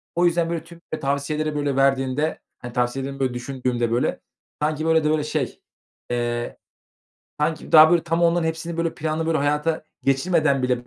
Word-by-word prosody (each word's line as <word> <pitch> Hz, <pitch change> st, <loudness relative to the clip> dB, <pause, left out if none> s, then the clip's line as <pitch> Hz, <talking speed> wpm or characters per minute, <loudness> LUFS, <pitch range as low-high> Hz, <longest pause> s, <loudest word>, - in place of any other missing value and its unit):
O 175 Hz, +1 st, +3 dB
yüzden, 170 Hz, -1 st, +2 dB
böyle, 165 Hz, -2 st, -3 dB
tüm 170 Hz, 0 st, -15 dB
ve 155 Hz, -, -2 dB
tavsiyeleri, 150 Hz, +2 st, -1 dB
böyle, 145 Hz, -2 st, -1 dB
verdiğimde, 135 Hz, +2 st, +1 dB, 0.2 s
hani, 120 Hz, -1 st, -8 dB
tavsiyelerini, 135 Hz, +3 st, -2 dB
böyle, 130 Hz, -2 st, 0 dB
düşündüğümde, 125 Hz, -1 st, -2 dB
böyle, 120 Hz, +2 st, 0 dB, 0.4 s
sanki, 155 Hz, +1 st, 0 dB
böyle, 160 Hz, -1 st, +3 dB
de, 150 Hz, -, +2 dB
öyle, 155 Hz, -1 st, +1 dB
şey, 150 Hz, -4 st, -3 dB, 0.5 s
eee, 120 Hz, 0 st, -2 dB, 0.8 s
sanki 155 Hz, +1 st, -1 dB
daha, 155 Hz, 0 st, +9 dB
böyle, 175 Hz, -2 st, +4 dB
tam 165 Hz, +1 st, 0 dB
onların 170 Hz, 0 st, +3 dB
hepsini, 160 Hz, +1 st, -3 dB
böyle, 165 Hz, -1 st, -1 dB
planlı, 160 Hz, +1 st, -2 dB
böyle, 165 Hz, -1 st, +1 dB
hayata 150 Hz, +3 st, 0 dB, 0.2 s
geçirmeden 140 Hz, 0 st, +2 dB
bile, 125 Hz, -1 st, 0 dB
150 Hz, 170 wpm, -23 LUFS, 135-160 Hz, 0.8 s, daha